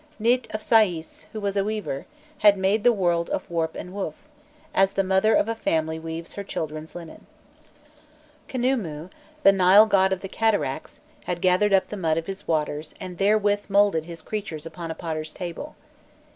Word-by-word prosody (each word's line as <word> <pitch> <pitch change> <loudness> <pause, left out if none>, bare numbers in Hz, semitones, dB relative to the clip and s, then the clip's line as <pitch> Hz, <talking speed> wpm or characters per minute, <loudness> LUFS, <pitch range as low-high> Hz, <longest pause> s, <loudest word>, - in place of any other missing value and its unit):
Nît 240 +3 +2
of 215 - -4
Saïs, 185 -8 +2
who 220 - -5
was 200 -1 -2
a 200 - +2
weaver, 210 -9 -4 0.3
had 205 -1 +6
made 195 +3 +1
the 245 - +6
world 175 -5 0
of - - -3
warp 165 -1 -1
and 180 - -7
woof, 190 -6 -4 0.6
as 195 0 +3
the 195 - +1
mother 190 +3 +3
of - - +3
a 230 - 0
family 160 -7 -1
weaves 165 +1 -6
her 200 - -5
children's 155 -4 -5
linen. 170 -2 -10 1.2
Khnûmû, 220 - -2 0.3
the 195 - +8
Nile 195 +2 +7
God 190 -3 +3
of 190 -1 -1
the 195 - -5
cataracts, 190 -10 -1 0.2
had 175 -1 -2
gathered 185 +3 +3
up 195 -1 +3
the 210 - -5
mud 160 -4 0
of 165 - -2
his 195 +1 -7
waters 155 -1 -2
and 185 -3 -8
therewith 205 0 +2
moulded 200 -5 +3
his 170 -1 -9
creatures 195 -8 -5
upon 165 +1 -7
a 160 - -4
potter's 155 -2 -4
table. 175 -3 -7
190 Hz, 180 wpm, -25 LUFS, 165-205 Hz, 1.2 s, the